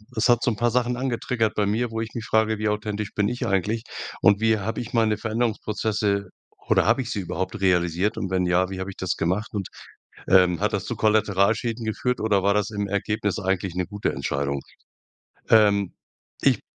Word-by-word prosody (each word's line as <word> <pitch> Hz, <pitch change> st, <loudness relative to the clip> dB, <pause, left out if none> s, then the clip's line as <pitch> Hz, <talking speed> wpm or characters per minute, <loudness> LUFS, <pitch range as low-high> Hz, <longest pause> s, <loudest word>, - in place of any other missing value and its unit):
es 115 Hz, +2 st, +2 dB
hat 120 Hz, -1 st, +4 dB
so 125 Hz, -, +2 dB
'n 110 Hz, -, -4 dB
paar 120 Hz, +1 st, +2 dB
Sachen 125 Hz, +1 st, +1 dB
angetriggert 120 Hz, -3 st, -1 dB
bei 105 Hz, -, +1 dB
mir, 115 Hz, +4 st, 0 dB
wo 115 Hz, 0 st, -3 dB
ich 110 Hz, -, -4 dB
mich 115 Hz, -2 st, -5 dB
frage, 110 Hz, -1 st, +1 dB
wie 110 Hz, -, 0 dB
authentisch 105 Hz, 0 st, -3 dB
bin 105 Hz, 0 st, +1 dB
ich 125 Hz, 0 st, -3 dB
eigentlich? 105 Hz, +3 st, 0 dB, 0.4 s
Und 105 Hz, -1 st, +5 dB
wie 110 Hz, -1 st, +3 dB
habe 110 Hz, +3 st, -3 dB
ich 120 Hz, -, -8 dB
meine 110 Hz, -2 st, +2 dB
Veränderungsprozesse 110 Hz, -3 st, -1 dB, 0.4 s
oder -, -, +3 dB
habe 115 Hz, +5 st, +3 dB
ich 120 Hz, -, -6 dB
sie 105 Hz, -, -2 dB
überhaupt 95 Hz, +3 st, -4 dB
realisiert 90 Hz, +1 st, +1 dB
und 95 Hz, -, -3 dB
wenn 95 Hz, -1 st, +1 dB
ja, 90 Hz, +1 st, +2 dB
wie 95 Hz, -1 st, -6 dB
habe 95 Hz, +1 st, -4 dB
ich -, -, -15 dB
das 95 Hz, -2 st, -1 dB
gemacht 95 Hz, +6 st, -1 dB
und, 100 Hz, -3 st, -3 dB, 0.6 s
ähm, 90 Hz, -3 st, +5 dB
hat -, -, +1 dB
das -, -, -1 dB
zu -, -, -3 dB
Kollateralschäden 110 Hz, +2 st, +1 dB
geführt 125 Hz, +3 st, -1 dB
oder 105 Hz, -3 st, +2 dB
war 100 Hz, +1 st, +3 dB
das 105 Hz, 0 st, 0 dB
im 100 Hz, -1 st, -2 dB
Ergebnis 100 Hz, +1 st, -1 dB
eigentlich 95 Hz, -2 st, -1 dB
'ne 90 Hz, -1 st, -1 dB
gute 105 Hz, +1 st, -2 dB
Entscheidung? 70 Hz, 0 st, -2 dB, 0.9 s
Ähm, 100 Hz, -4 st, +4 dB, 0.5 s
ich -, -, +3 dB
105 Hz, 200 wpm, -24 LUFS, 95-110 Hz, 0.9 s, Und